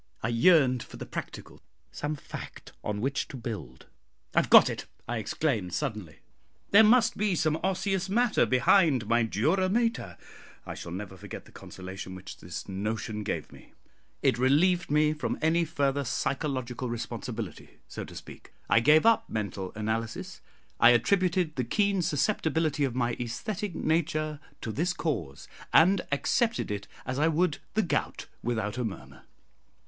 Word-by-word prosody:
I 110 - 0
yearned 130 0 +4
for - - -10
the - - -6
practical - - -7 0.3
some 150 +1 -3
fact 140 - -9
on 105 -1 -3
which 140 +3 -1
to 135 - -8
build. 90 - -7 0.5
"I - - +5
have - - -1
got - - +9
it," - - -4 0.2
I 120 +1 -2
exclaimed 110 - -1
suddenly. 105 - -4 0.5
"There 205 +2 +8
must 230 +1 +4
be 205 -3 +1
some 155 -1 +1
osseous 190 0 -1
matter 235 +2 +3
behind 130 - +4
my 115 +2 +3
dura 155 - +1
mater!" 230 - 0 0.5
I - - -5
shall 85 - -8
never 95 +1 -6
forget 95 - -9
the - - -17
consolation 95 0 -8
which 95 +1 -9
this - - -7
notion 105 +2 -3
gave 105 - -4
me: - - -16 0.5
it 115 - +3
relieved 170 +7 +3
me 150 +1 +3
from 150 -4 -3
any 165 +2 +2
further 140 -2 0
psychological 130 -1 -2
responsibility, 115 -2 -6
so - - -6
to - - -11
speak; - - -11 0.2
I - - +7
gave 150 - +5
up 230 0 +4
mental 100 -3 -3
analysis. 110 +1 -3 0.4
I 115 - +8
attributed 175 - +2
the 130 - +1
keen 200 - +1
susceptibility 160 -2 0
of 125 -3 -3
my 120 -1 0
æsthetic 185 - -4
nature 155 -2 0 0.2
to 110 - -4
this 170 - 0
cause, 95 - -3 0.2
and 180 +3 +5
accepted 225 - +1
it 100 -1 -4 0.2
as 130 +2 -3
I 155 - +4
would 165 0 +1 0.2
the 220 - +3
gout, 175 - -2 0.2
without 110 -1 -2
a - - 0
murmur. 110 -5 -7
140 Hz, 155 wpm, -28 LUFS, 110-170 Hz, 0.5 s, got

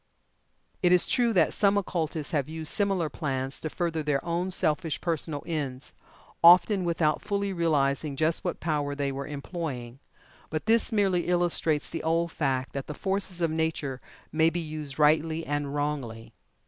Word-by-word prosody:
It 180 - +3
is 180 -1 +5
true 240 -2 +2
that 170 -6 +3
some 200 -1 +3
occultists 160 -6 -2
have 145 -2 -1
used 160 -1 -2
similar 195 -5 +1
plans 135 -4 -3
to 155 - -4
further 165 -1 -2
their 145 -2 -1
own 175 +2 -1
selfish 160 -3 0
personal 160 -3 -2
ends 140 -6 -4 0.5
often 180 +3 +7
without 165 -3 +1
fully 200 -1 -2
realizing 150 -4 +1
just 160 +3 +1
what - - -3
power 145 -3 -1
they 140 -1 -1
were 135 0 -5
employing 140 -5 -6 0.5
but 155 -1 -3
this 230 +2 +3
merely 195 -5 +1
illustrates 175 -3 +2
the 165 - -3
old 165 +1 0
fact 130 -5 -1
that 140 -1 -5
the 150 - -6
forces 190 -1 -1
of 165 -2 +1
Nature 160 -5 -2 0.3
may 160 +1 +3
be 175 - -3
used 155 -4 -6
rightly 160 +2 +2
and 145 -1 -2
wrongly. 130 -7 -3
160 Hz, 160 wpm, -27 LUFS, 145-175 Hz, 0.5 s, often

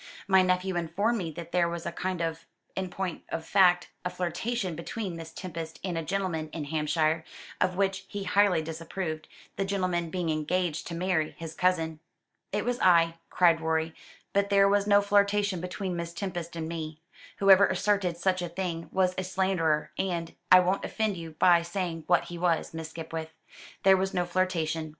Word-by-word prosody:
My 190 -1 +6
nephew 185 0 +1
informed 200 +8 0
me 170 -4 -3
that 170 +2 -8
there 175 -1 +2
was 170 0 -5
a - - -2
kind 185 0 -3
of 165 0 -3 0.3
in 190 -1 -2
point 185 -2 -4
of 160 - -4
fact 180 -3 +4
a 180 - -1
flirtation 180 +2 -2
between 180 +3 -5
Miss 165 -1 -8
Tempest 165 -3 -7
and 185 -3 -2
a 165 - -1
gentleman 165 -3 -2
in 160 - -3
Hampshire, 155 +1 0 0.4
of 185 0 +2
which 195 0 0
he 205 -1 -5
highly 195 -5 +3
disapproved, 160 0 -5 0.3
the 195 - +1
gentleman 185 -4 -1
being 175 -1 -1
engaged 160 +2 -1
to 170 - -5
marry 175 -3 0
his 165 -1 -7
cousin." 165 -3 +1 0.5
"It 210 +2 -1
was 245 0 -1
I," 165 -2 +4
cried 170 -2 +4
Rorie, 160 0 0 0.4
"but 200 0 +2
there 200 0 +5
was 200 0 +2
no 205 0 +5
flirtation 200 -2 +2
between 185 0 -3
Miss 170 0 -4
Tempest 175 -4 -4
and 160 -1 -3
me. 160 -2 -5 0.4
Whoever 195 0 +7
asserted 200 -5 +1
such 185 +1 +1
a 175 - -3
thing 170 -2 -4
was 185 -1 +2
a - - -1
slanderer 180 -5 0
and 170 -3 -2 0.2
I 185 0 +10
won't 185 +2 0
offend 220 -3 -1
you 165 -2 -8
by 175 -2 +6
saying 170 -2 -4
what 175 -1 +4
he 175 -1 -8
was, 170 -3 +1
Miss 160 -1 -5
Skipwith. 160 -1 -6 0.5
There 190 0 +7
was 190 +1 -1
no 180 -1 +1
flirtation. 165 -3 -1
175 Hz, 180 wpm, -28 LUFS, 165-190 Hz, 0.5 s, I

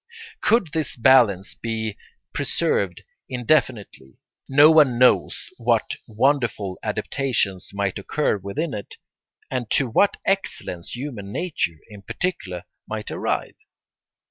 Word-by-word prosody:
Could 220 -6 +3
this 160 -2 -2
balance 115 -7 +4
be 110 -2 -3 0.4
preserved 465 +2 0 0.3
indefinitely, 125 - -1 0.3
no 145 +3 +7
one 145 -6 +5
knows 125 +1 +3
what - - +1
wonderful 115 -5 0
adaptations 110 -9 -1
might 100 0 -2
occur 110 +3 0
within 100 - -3
it, 105 -2 -7 0.6
and 125 -4 -3
to 135 - +3
what 200 - +2
excellence 190 - -2
human 120 -7 -6
nature 145 - -2
in 105 -2 -12
particular 110 - -3 0.2
might - - -5
arrive. - - -2
120 Hz, 110 wpm, -23 LUFS, 100-145 Hz, 0.6 s, no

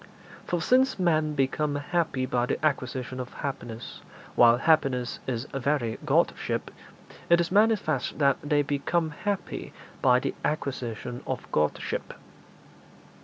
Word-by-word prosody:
For 175 -2 -1
since 260 +1 +3
men 155 -4 +1
become 145 +2 0
happy 145 -3 -1
by 125 -1 0
the 155 - -1
acquisition 130 -3 -1
of 125 -1 -5
happiness, 120 -4 -6 0.3
while 120 0 +6
happiness 130 -5 +2
is 120 -1 -2
very 135 -4 0
Godship, - - 0 0.6
it 170 0 +6
is 170 0 0
manifest 205 - +2
that 140 -2 +3
they 145 0 +2
become 150 +3 0
happy 200 +5 -4 0.3
by 125 -1 +5
the - - -2
acquisition 125 -5 -3
of - - -3
Godship. 75 0 -1
140 Hz, 120 wpm, -27 LUFS, 125-160 Hz, 0.6 s, while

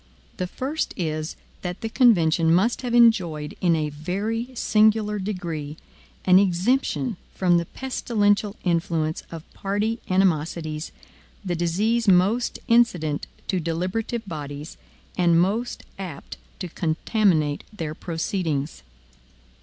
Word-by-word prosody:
The 180 - -2
first 275 - -3
is, 155 -2 -2 0.3
that 180 +2 -5
the 225 - -2
convention 175 -9 +4
must 195 +8 +3
have 245 -2 -1
enjoyed, 180 -11 +3
in 175 -2 +4
a 155 -1 -1
very 200 - -3
singular 215 -2 +3
degree, 170 -7 -4 0.5
an 185 0 +7
exemption 200 +4 +1 0.2
from 180 -2 +3
the 170 - -4
pestilential 210 -5 0
influence 165 -3 0
of 165 -2 -8
party 210 +4 -1
animosities 165 -4 0 0.5
the 180 - -1
disease 210 +8 +1
most 195 +6 +3
incident 180 - +2 0.2
to 185 - 0
deliberative 185 +8 -2
bodies, 150 -2 -6 0.4
and 170 -2 +4
most 210 +7 0 0.2
apt 180 -7 -7 0.2
to 185 - -5
contaminate 160 -2 +1
their 165 -8 -4
proceedings. 160 -3 -3
180 Hz, 115 wpm, -24 LUFS, 160-215 Hz, 0.5 s, an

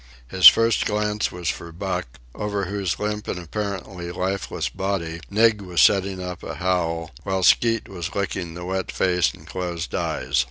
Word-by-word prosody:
His 95 -1 +8
first 115 0 +6
glance 105 0 0
was 90 -1 -3
for 85 - -5
Buck, 90 -5 -4 0.2
over 105 -2 -2
whose 95 -1 -2
limp 105 0 -3
and - - -2
apparently 95 0 -5
lifeless 95 +3 -2
body 85 -4 -3
Nig 110 0 +3
was 90 -3 -3
setting 95 0 +4
up 90 -1 -6
a - - -6
howl, 85 -2 -1
while 95 -1 -1
Skeet 115 +4 +4
was 90 0 -6
licking 90 -3 -3
the 90 0 -6
wet 95 0 -2
face 90 -5 +2
and - - -16
closed 85 -3 -4
eyes. 70 +2 -1
95 Hz, 165 wpm, -23 LUFS, 85-100 Hz, 0.2 s, His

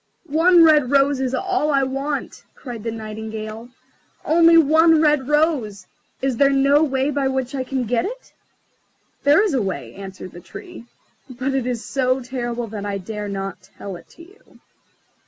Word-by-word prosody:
"One 335 +3 +5
red 300 -5 +5
rose 280 0 +3
is 265 -1 -1
all 375 -1 -1
I 275 -2 +2
want," 275 +2 -4
cried 240 -4 -8
the 230 - -2
Nightingale, 220 +1 -7 0.6
"only 330 +1 +5
one 320 +1 +5
red 300 -4 +2
rose! 285 - 0 0.4
Is 265 -3 0
there 280 +2 +4
no 275 +2 +3
way 270 -1 0
by 280 -1 0
which 265 0 -2
I 265 -2 -2
can 260 0 -3
get 235 0 0
it?" - - -8 0.9
"There 290 +8 +5
is 410 -7 0
a 260 - +1
way," 190 -2 -4
answered 190 -2 -9
the 175 - -11
Tree; 360 - -11 0.4
"but 255 +2 -3
it 265 -2 -1
is 245 -2 -3
so 255 -1 0
terrible 240 -2 -4
that 205 -1 -6
I 200 -1 -3
dare 210 +2 -6
not 195 0 -5 0.2
tell 195 -2 -7
it 175 - -14
to 335 - -15
you." 390 +6 -21
265 Hz, 175 wpm, -21 LUFS, 225-300 Hz, 0.9 s, One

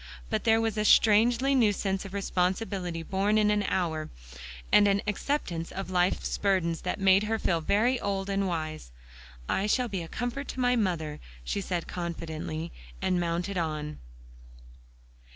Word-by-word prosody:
But 220 +1 -1
there 225 0 +5
was 225 -1 -1
a - - +2
strangely 235 +6 +5
new 235 -6 +4
sense 195 -1 -2
of 195 - -9
responsibility, 185 -2 -1
born 200 +4 +1
in 210 -1 +4
an 210 0 +2
hour; 160 -4 -1 0.6
and 205 - +6
an 200 0 +2
acceptance 205 - -2
of 195 -1 -5
life's 180 0 0
burdens, 185 -5 +1
that - - -3
made 195 +1 +5
her 225 +1 0
feel 170 -6 0
very 235 +9 +2
old 195 -2 -2
and 195 0 0
wise. 155 - -4 0.6
"I 195 - 0
shall 245 +3 +1
be 195 -3 -3
a 165 - -6
comfort 245 +8 -4
to - - -6
my 250 0 +3
mother," 165 -9 -1 0.2
she 200 - -2
said 180 -3 -3
confidently, 165 -2 -5 0.3
and 180 -1 +1
mounted 175 +3 -1
on. 155 -2 -3
195 Hz, 160 wpm, -28 LUFS, 170-215 Hz, 0.6 s, and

